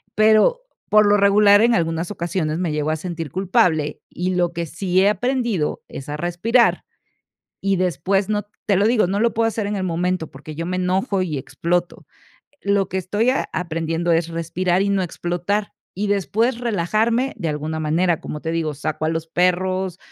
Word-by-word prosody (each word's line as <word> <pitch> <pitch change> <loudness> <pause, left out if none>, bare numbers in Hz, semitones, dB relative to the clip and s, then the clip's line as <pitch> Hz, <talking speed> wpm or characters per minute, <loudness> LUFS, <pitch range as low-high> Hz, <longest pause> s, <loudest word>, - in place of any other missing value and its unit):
pero, 220 - +4 0.3
por 210 0 +6
lo 205 - +5
regular, 205 +1 +5
en 235 +1 +4
algunas 165 +2 -1
ocasiones 170 -4 -2
me 175 -3 -1
llego 150 0 -1
a - - +1
sentir 165 -3 -5
culpable. 175 -4 +1
Y 180 +1 -2
lo 175 -1 +1
que 170 0 -3
sí 180 +3 0
he 195 - +4
aprendido 235 - -1
es 135 - -9
a 150 - -3
respirar 175 +9 +2 0.8
y 195 0 +1
después 185 +3 0
no 210 -1 0 0.2
te 200 - +3
lo 205 +3 +3
digo, 230 -4 +3
no 195 +3 -1
lo 235 0 +2
puedo 225 0 +2
hacer 215 -2 -3
en 205 - -2
el 190 - -2
momento, 180 -1 -1
porque 150 +3 -10
yo 165 +2 -4
me 185 +1 -2
enojo 190 +3 0
y 155 -5 -3
exploto. 175 +6 -2 0.6
Lo 200 -1 +1
que 190 - -2
estoy 205 +7 +1
a 265 - -1
aprendiendo 165 0 -1
es 165 0 +1
respirar 170 +2 0
y 200 - 0
no 195 -1 +1
explotar, 180 +4 -2 0.2
y 205 +2 -1
después 225 +5 0
relajarme 230 +4 0
de 170 -5 -2
alguna 155 +1 -3
manera. 165 +2 +1
Como 150 - -6
te 160 +1 -3
digo, 160 -3 -1
saco 155 +2 -3
a 160 - +1
los 165 0 -3
perros, 185 +1 0
180 Hz, 190 wpm, -21 LUFS, 165-205 Hz, 0.8 s, por